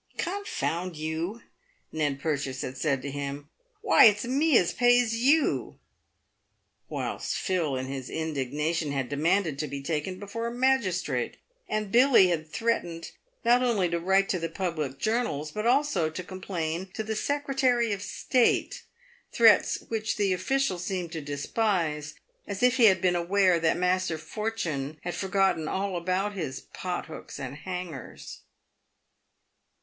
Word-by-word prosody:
" - - -32
Confound 185 - -3
you!" 160 +8 -3 0.5
Ned 145 -3 -1
Purchase 140 -3 -2
had 130 - -5
said 135 -2 0
to 140 - -4
him, 140 +1 -5 0.3
"why - - +7
it's 210 0 +5
me 280 +2 +3
as 175 - +2
pays 245 -2 +4
you 280 +7 +2 0.5
;" - - -48
whilst - - -3
Phil, 170 -7 0
in 130 0 -3
his 135 -1 -6
indignation, 150 +1 -2
had 135 -3 -2
demanded 160 +1 +1
to 150 - -1
be 140 0 -5
taken 165 +5 -2
before 205 +4 -5
a - - -3
magistrate; 245 -7 0 0.3
and 215 -2 -2
Billy 240 -6 +6
had 160 -2 -2
threatened, 175 -6 -2 0.3
not 240 +1 +5
only 225 -7 +2
to 170 0 -1
write 190 +3 +3
to 185 - 0
the 165 0 -3
public 160 -6 -3
journals, 215 -10 -1
but 215 +5 -2
also 245 - +2
to 160 +4 -6
complain 180 -2 -4
to 220 - -2
the 220 0 -3
Secretary 265 -3 +1
of 195 - -4
State 245 +4 +1 0.3
— 480 0 -31
threats 225 -3 +5
which 220 -1 -2
the 200 -3 +2
official 270 -1 0
seemed 180 -2 -3
to 165 -2 -4
despise, 150 0 -1 0.3
as 200 +2 -4
if 250 0 +4
he 240 - +6
had 190 -3 +5
been 180 -1 +2
aware 180 0 +3
that 160 -1 +2
Master 180 -2 +1
Fortune 160 -7 -3
had 175 - -3
forgotten 190 -4 +1
all 195 +2 -2
about 185 +4 -1
his 155 -9 -4
"pothooks 175 -5 -5
and 135 0 -5
hangers." 180 -3 -7
185 Hz, 150 wpm, -27 LUFS, 155-220 Hz, 0.5 s, why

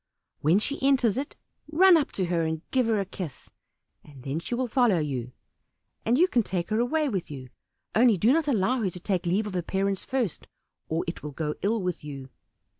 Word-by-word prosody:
When 160 +6 +3
she 280 +7 -1
enters 260 -6 +3
it, 275 +2 -4 0.4
run 365 +3 +7
up 310 -4 +1
to 190 - 0
her 170 -1 0
and 160 0 -2
give 255 -3 +2
her 220 -2 +2
a 195 - -1
kiss, 180 -6 -8 0.5
then 140 +1 -6
she 240 - -3
will 255 +1 -1
follow 240 -5 +3
you, 130 -6 -3 0.7
and 235 +3 +2
you 355 +5 +5
can 245 -9 +2
take 185 -3 -3
her 215 - +2
away 300 +6 +1
with 195 -9 -3
you; 130 -3 -8 0.4
only 230 -1 +5
do 225 +8 +4
not 320 -1 +1
allow 245 0 +1
her 200 - +1
to 180 - -9
take 180 -1 -1
leave 195 +5 +1
of 205 - -5
her 180 - 0
parents 195 +2 -1
first, 245 - -2 0.4
or 160 +1 0
it 170 - -5
will 150 -1 -7
go 150 0 -2
ill 210 0 0
with 180 -3 -3
you." 135 -3 -8
195 Hz, 210 wpm, -27 LUFS, 165-245 Hz, 0.7 s, run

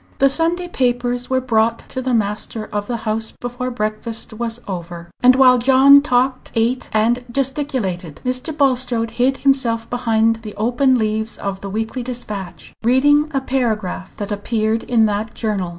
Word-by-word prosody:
The 275 0 +4
Sunday 340 +4 +1
papers 245 -4 -1
were 260 0 +2
brought 230 -2 0
to 260 - -4
the 255 -1 0
master 215 +1 -2
of 205 0 -2
the 240 - -2
house 220 +1 -2
before 245 +1 -4
breakfast 220 0 -4
was 230 +1 -4
over; 170 -2 -7
and 250 +1 +6
while 255 -1 +6
John 270 +3 +7
talked, 255 -1 0
ate, 235 +3 0
and 230 +3 +1
gesticulated, 250 - -2
Mr. 255 +5 -1
Bulstrode 250 -5 +1
hid 265 +2 +3
himself 240 -5 +2
behind 225 -2 +1
the 220 -2 -9
open 250 +4 +2
leaves 220 0 -1
of 195 -1 -4
the 200 - -6
Weekly 220 +5 -3
Dispatch, 215 -7 -6
reading 290 +5 +4
a 270 -3 -1
paragraph 220 -8 -2
that 205 0 -5
appeared 220 +2 -1
in 230 -3 +3
that 210 +1 -2
journal. 205 -5 -2
235 Hz, 160 wpm, -19 LUFS, 215-255 Hz, -, John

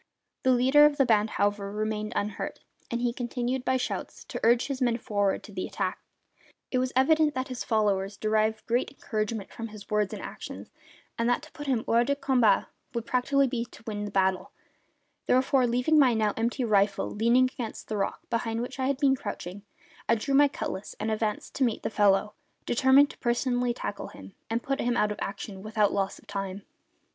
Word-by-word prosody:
The 260 - +1
leader 260 +4 +6
of 290 -1 -2
the 270 - +4
band, 215 -2 +3
however, 205 0 0
remained 215 +1 -2
unhurt, 205 0 -3 0.3
and 235 0 -2
he 240 -1 +1
continued, 245 +1 -2
by 260 0 +2
shouts, 255 - -4
to - - -4
urge 235 +1 +4
his 275 -2 -4
men 240 -2 +2
forward 205 -4 0
to - - -11
the - - -4
attack. - - -3 0.7
It 255 - +2
was 255 0 0
evident 300 +3 +4
that 260 +1 -2
his 255 -2 -4
followers 200 -3 0
derived 215 0 0
great 240 +2 +1
encouragement 215 -5 -4
from 230 - -6
his 210 -2 -12
words 210 -2 +1
and - - -5
actions, - - -8 0.5
and 230 +1 +2
that 245 +4 +1
to 310 - -13
put 290 -2 -8
him 245 -4 +1
hors 235 +1 +4
de 280 +2 +1
combat 260 -5 +3 0.3
would 235 -1 -2
practically 275 +3 +2
be 245 -2 -1
to 235 - -16
win 210 -2 -3
the - - -4
battle; 190 -1 +1 0.8
therefore, 255 0 +3
leaving 250 +6 +3
my 255 -5 +5
now 215 -2 +1
empty 235 +3 -1
rifle 200 -3 +2
leaning 235 +4 +3
against 230 -3 -6
the 215 - -3
rock 195 - -3
behind 230 -1 -1
which 250 +3 -5
I 260 - +1
had 275 -1 +1
been 275 -1 +3
crouching, 205 -4 -6 0.5
I 230 - +5
drew 275 +5 -2
my 285 +1 +7
cutlass 195 -7 -5
and 220 - -1
advanced 215 -1 -2
to 275 - 0
meet 235 -4 0
the - - -2
fellow, 205 0 +3 0.3
determined 265 +3 +5
to - - -17
personally 245 0 +1
tackle 200 - -5
him 95 0 -12 0.2
and 230 +1 -1
put 275 +1 -1
him 240 0 0
out 210 -2 +2
of 210 - -5
action 195 -1 -5
without 215 0 +1
loss 195 -1 -1
of - - -18
time. 195 -1 -5
230 Hz, 200 wpm, -28 LUFS, 210-255 Hz, 0.8 s, my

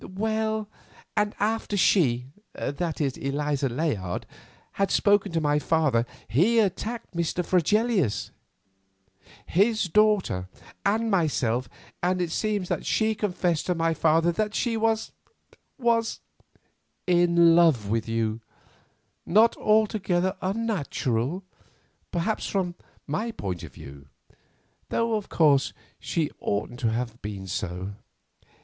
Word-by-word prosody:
"Well, 220 0 -1 0.5
and 210 -1 +1
after 215 0 0
she—that 155 - 0
is, 140 -4 -1
Eliza 140 0 -1
Layard—had 130 - -4
spoken 205 -1 +3
to 165 - +2
my 150 -1 +2
father, 145 -7 +1 0.2
he 175 - +3
attacked 220 +2 -1
Mr. 170 +1 -1
Fregelius, 190 - +1 1.1
his 215 +5 +2
daughter, 190 - +2 0.3
and 220 +2 +1
myself, 130 - +1 0.3
and 180 +1 +1
it 175 -2 -1
seems 205 -1 -1
that - - -2
she 220 0 +1
confessed 180 -6 -1
to 180 - +1
my 165 0 +1
father 165 +2 +3
that 210 +3 -2
she 240 -2 0
was—was——" 225 +1 -2 0.9
"In 170 -2 +5
love 160 -12 +4
with 115 +1 -1
you—not 115 - -1
altogether 195 -4 +2
unnatural, 185 - -1 0.7
perhaps, 185 +5 -1
from 185 -3 -1 0.3
my 185 +11 -2
point 95 - -4
of - - -10
view; 70 0 -12 0.8
though, 230 0 0
of 210 -2 -2
course, 145 -4 +3 0.3
she 160 -3 -1
oughtn't 105 +4 -2
to 115 - +1
have 115 0 -3
been 100 -2 -6
so." 95 +1 -4
175 Hz, 110 wpm, -26 LUFS, 135-210 Hz, 1.1 s, In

